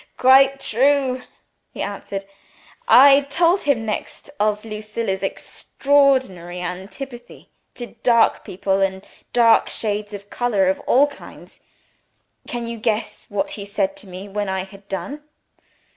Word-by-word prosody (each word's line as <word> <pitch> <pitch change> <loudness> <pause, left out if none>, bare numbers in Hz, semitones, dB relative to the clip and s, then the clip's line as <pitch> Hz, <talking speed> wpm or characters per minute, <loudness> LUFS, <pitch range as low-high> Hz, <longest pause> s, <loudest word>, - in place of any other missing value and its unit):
"Quite 270 +1 +5
true!" 265 +1 +1 0.5
he - - -5
answered. 200 -1 -5 0.6
"I 275 +2 +8
told 345 +5 +3
him 255 -6 0
next 220 +6 -5
of 210 +1 0
Lucilla's 215 -2 -4
extraordinary 260 -6 0
antipathy 225 +8 -8 0.3
to 240 - -5 0.2
dark 235 -2 +3
people, 195 +1 -1
and 190 0 -1 0.3
dark 230 -2 +4
shades 210 -1 -2
of 200 0 -12
color 210 -6 +1
of 190 - -1
all 275 +3 +5
kinds. 290 - -12 0.9
Can 240 -1 -4
you 230 0 -6
guess 220 0 -2
what 205 -1 -2
he 205 - -6
said 200 -1 -1
to 205 - -12
me 185 +2 -8
when 205 0 -3
I 190 -1 -2
had 195 +1 -15
done?" 275 +10 -5
215 Hz, 130 wpm, -21 LUFS, 195-260 Hz, 0.9 s, I